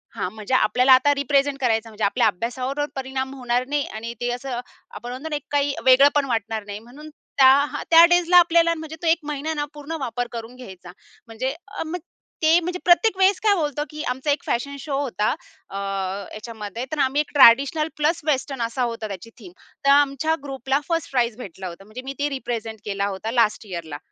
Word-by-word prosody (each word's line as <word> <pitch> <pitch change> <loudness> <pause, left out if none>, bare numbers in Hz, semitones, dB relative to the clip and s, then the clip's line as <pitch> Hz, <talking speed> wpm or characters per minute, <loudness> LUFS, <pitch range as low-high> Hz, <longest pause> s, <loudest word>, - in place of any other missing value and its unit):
हा, - - -2
म्हणजे 215 +4 -6
आपल्याला 250 +3 +4
आता 260 +3 +5
रिप्रेझेंट 280 0 +1
करायचं 225 -3 0
म्हणजे 215 -1 -7
आपल्या 225 +3 +3
अभ्यासावर 250 +8 -2
परिणाम 265 0 -4
होणार 250 -1 -1
नाही 290 0 -1
आणि 230 +2 -5
ते 245 - 0
असं 245 0 -4 0.4
आपण 240 - -7
म्हणतो 260 +6 -6
ना 300 - -2
एक 290 - -5
काही 285 -1 +1
वेगळं 260 +2 +7
पण 290 -1 +3
वाटणार 225 -3 -2
नाही. 205 0 -7
म्हणून 265 +7 -13 0.3
त्या 280 +2 +5
त्या 330 +1 +9
डेजला 350 0 +4
आपल्याला 335 -1 +5
म्हणजे 315 -1 -8
तो 340 - -2
1 325 +1 +5
महिना 300 +1 -3
ना 295 -1 -2
पूर्ण 295 +2 -6
वापर 245 -2 -3
करून 230 +1 -7
घ्यायचा. 190 -8 -11 0.4
म्हणजे 245 +4 -3 0.2
अ, - - -1
मग 345 +3 -4 0.4
ते 320 +2 +6
म्हणजे 360 +1 -4
प्रत्येक 375 +4 +4
वेळेस 380 0 +3
काय 420 -2 +5
होतं 295 -4 -1
की 305 -1 -6
आमचा 265 +3 -2
1 285 - -1
फॅशन 280 +4 -2
शो 275 0 -3
होता. 225 -6 -1 0.4
अ, - - -9
ह्याच्यामध्ये 200 +3 -5
तर 310 - -3
आम्ही 270 +3 +1
एक 300 - -8
ट्रेडिशनल 280 +4 +6
प्लस 310 +3 +1
वेस्टर्न 270 -2 -1
असा 235 +3 -2
होता 230 -2 -3
त्याची 200 +2 -8
थीम. 190 -6 -12 0.3
तर - - +4
आमच्या 285 +2 +3
ग्रुपला 270 0 -1
1st 330 -2 -1
प्राइज 240 -3 0
भेटलं 190 -5 -8
होता. 175 +2 -10
म्हणजे 215 +5 -9
मी 270 - -5
ते 290 +1 0
रिप्रेझेंट 230 -5 -5
केला 200 -1 -1
होता 200 +3 -4
लास्ट 230 -2 +1
यिअरला. 165 -5 -6
260 Hz, 200 wpm, -23 LUFS, 225-295 Hz, 0.4 s, त्या